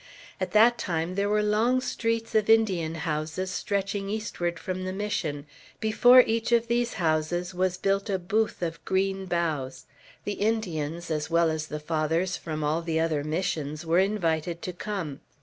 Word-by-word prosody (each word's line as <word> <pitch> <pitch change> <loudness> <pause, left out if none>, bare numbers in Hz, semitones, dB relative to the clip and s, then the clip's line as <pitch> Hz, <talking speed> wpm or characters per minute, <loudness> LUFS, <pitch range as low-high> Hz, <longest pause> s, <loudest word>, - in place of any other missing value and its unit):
At 185 -1 -3
that 235 +3 +5
time 165 0 -2
there 200 +2 0
were 210 0 +2
long 220 +5 +2
streets 230 -2 -2
of 215 -1 +2
Indian 190 -8 +3
houses 160 +3 -3
stretching 200 0 -2
eastward 200 -5 -2
from 185 +2 -4
the 185 - -3
Mission; 185 -8 -3 0.3
before 245 +3 +7
each 230 0 -1
of 235 0 +3
these 235 0 0
houses 175 0 0
was 185 0 0
built 195 +2 0
a 195 - +1
booth 210 +2 -1
of 165 -1 -4
green 190 0 0
boughs. 150 -7 -2 0.4
The 205 - -3
Indians, 170 -7 -1
as 155 0 -2
well 170 -1 +3
as 155 0 -3
the 150 - -5
Fathers 160 +4 0
from 155 -3 -4
all 155 +3 +1
the 165 -1 -1
other 160 -3 0
Missions, 155 -1 -2
were 165 +2 +3
invited 170 -4 0
to 180 - -4
come. 180 -7 -4
180 Hz, 165 wpm, -27 LUFS, 160-210 Hz, 0.4 s, before